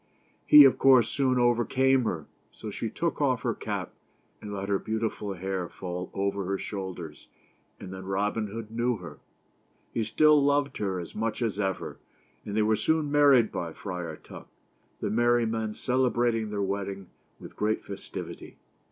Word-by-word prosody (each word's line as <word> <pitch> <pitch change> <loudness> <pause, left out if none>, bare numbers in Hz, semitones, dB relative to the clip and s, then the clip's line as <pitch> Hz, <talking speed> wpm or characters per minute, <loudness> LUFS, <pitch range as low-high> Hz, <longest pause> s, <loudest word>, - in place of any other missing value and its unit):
He, 150 -1 +10
of 135 - +4
course, 130 -5 +6
soon 130 0 +1
over 120 -1 +3
came 130 0 +2
her; 80 -8 -2 0.3
so - - -8
she - - -3
took - - -2
off - - +1
her - - 0
cap, - - -5 0.5
and 105 - -7
let 100 -1 -4
her 100 -1 +1
beau 110 0 -3
tiful 105 -2 -3
hair 95 -1 -3
fall 90 -1 -6
over 100 0 -1
her 95 +1 -1
shoulders, 90 -8 -7 0.5
and 95 - -8
then 95 0 -8
Rob 100 +2 0
in 110 -2 -1
Hood 110 +1 -7
knew 120 +1 0
her. 85 -6 -10 0.7
He 115 - 0
still 150 +7 +4
loved 140 -1 +1
her 95 -3 -2
as 85 - -8
much 110 +2 -2
as 105 -3 -2
ever, 95 -2 -3 0.4
and 105 +1 -4
they 110 - +4
were 110 +1 +3
soon 155 +4 0
married 140 -6 +5
by 85 -2 -4
Friar 90 -4 -5
Tuck, - - -12 0.5
the - - -1
merry 120 +1 +3
men 110 -1 -2
celebrating 120 -3 +1
their 100 -1 -2
wedding 100 -1 -4 0.3
with - - -11
great 110 +1 -1
festivity. 100 - -8
105 Hz, 175 wpm, -28 LUFS, 95-120 Hz, 0.7 s, He